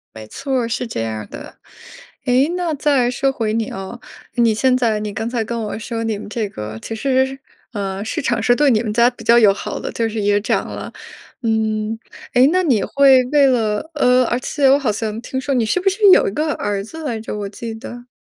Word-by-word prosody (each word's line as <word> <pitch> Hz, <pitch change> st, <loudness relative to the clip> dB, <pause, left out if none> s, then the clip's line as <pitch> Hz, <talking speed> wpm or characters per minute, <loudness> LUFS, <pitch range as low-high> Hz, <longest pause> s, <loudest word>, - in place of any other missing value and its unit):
没 110 Hz, -, -9 dB
错， 265 Hz, -, -2 dB
是 235 Hz, +1 st, -3 dB
这 115 Hz, -, -4 dB
样 110 Hz, -1 st, -3 dB
儿 110 Hz, -, -8 dB
的。 -, -, -10 dB, 0.7 s
哎， 255 Hz, +5 st, +3 dB
那 350 Hz, -3 st, -1 dB
再 275 Hz, -4 st, +2 dB
说 270 Hz, +2 st, 0 dB
回 220 Hz, -4 st, -2 dB
你 225 Hz, -1 st, -1 dB
哦， 195 Hz, +5 st, -7 dB, 0.4 s
你 235 Hz, -3 st, +3 dB
现 255 Hz, +4 st, +2 dB
在 230 Hz, -4 st, +1 dB
你 210 Hz, -1 st, -4 dB
刚 225 Hz, +2 st, -3 dB
才 235 Hz, -2 st, -1 dB
跟 235 Hz, +1 st, -4 dB
我 210 Hz, 0 st, -4 dB
说 225 Hz, +1 st, -4 dB
你 220 Hz, -2 st, -1 dB
们 205 Hz, -, -9 dB
这 215 Hz, -2 st, -3 dB
个 105 Hz, -, -7 dB
其 225 Hz, -, -5 dB
实， 265 Hz, +2 st, 0 dB, 0.3 s
呃， 195 Hz, -1 st, -3 dB
市 320 Hz, +8 st, -3 dB
场 240 Hz, -4 st, 0 dB
是 245 Hz, -, +4 dB
对 290 Hz, +2 st, +3 dB
你 215 Hz, -1 st, +2 dB
们 215 Hz, -2 st, -3 dB
家 235 Hz, +2 st, +5 dB
比 245 Hz, -2 st, -13 dB
较 235 Hz, +2 st, +5 dB
友 205 Hz, -4 st, +6 dB
好 -, -, -5 dB
的， -, -, -5 dB
就 225 Hz, -1 st, -1 dB
是 220 Hz, -, -4 dB
也 205 Hz, 0 st, +2 dB
涨 -, -, -1 dB
了。 -, -, -7 dB, 0.5 s
嗯， 220 Hz, -1 st, 0 dB, 0.4 s
哎， 255 Hz, +2 st, +6 dB
那 370 Hz, +1 st, +2 dB
你 245 Hz, -, +2 dB
会 270 Hz, 0 st, +5 dB
为 285 Hz, +2 st, +4 dB
了 225 Hz, +1 st, 0 dB
呃， 255 Hz, -3 st, +4 dB
而 240 Hz, -, 0 dB
且 275 Hz, +1 st, +1 dB
我 275 Hz, -, +6 dB
好 255 Hz, -6 st, 0 dB
像 215 Hz, +1 st, -3 dB
听 260 Hz, +1 st, -4 dB
说 275 Hz, +1 st, -2 dB
你 235 Hz, -3 st, +2 dB
是 230 Hz, -, +1 dB
不 375 Hz, -, -3 dB
是 395 Hz, +3 st, -5 dB
有 -, -, +6 dB
一 -, -, -1 dB
个 305 Hz, +4 st, 0 dB
儿 205 Hz, -1 st, -2 dB
子 320 Hz, +10 st, -9 dB
来 240 Hz, -7 st, -3 dB
着 215 Hz, -1 st, -6 dB
我 200 Hz, -1 st, -4 dB
记 225 Hz, +2 st, -7 dB
得？ 240 Hz, +2 st, -10 dB
235 Hz, 250 characters per minute, -19 LUFS, 215-265 Hz, 0.7 s, 友